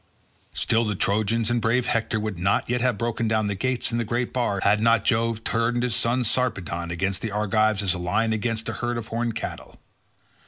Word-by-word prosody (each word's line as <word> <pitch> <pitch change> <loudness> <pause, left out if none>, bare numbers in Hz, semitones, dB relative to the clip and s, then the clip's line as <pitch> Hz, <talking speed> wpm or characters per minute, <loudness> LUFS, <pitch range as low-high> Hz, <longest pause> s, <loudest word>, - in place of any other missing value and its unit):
Still 115 +1 +2
the 105 -2 -1
Trojans 110 +4 +1
and 120 -1 +1
brave 120 +2 +2
Hector 115 -1 0
would 105 -4 -4
not 95 +3 +1
yet 125 0 0
have 125 -3 +1
broken 115 +1 -1
down 110 -1 +1
the 100 - 0
gates 125 +5 -1
and 115 - 0
the - - +1
great 120 +2 -2
bar, 120 -6 0
had 105 +1 +4
not 115 -2 +3
Jove 115 -1 +1
turned 120 +1 0
his 125 -3 0
son 120 +2 +1
Sarpedon 95 -8 -1
against 95 +2 -1
the 115 - -2
Argives 105 0 +1
as 95 - +2
a 90 - -4
lion 110 +6 +1
against 110 +1 -2
a - - -2
herd 120 0 -2
of 110 -2 -6
horned 115 0 -2
cattle. 110 - -6
115 Hz, 210 wpm, -24 LUFS, 105-120 Hz, -, had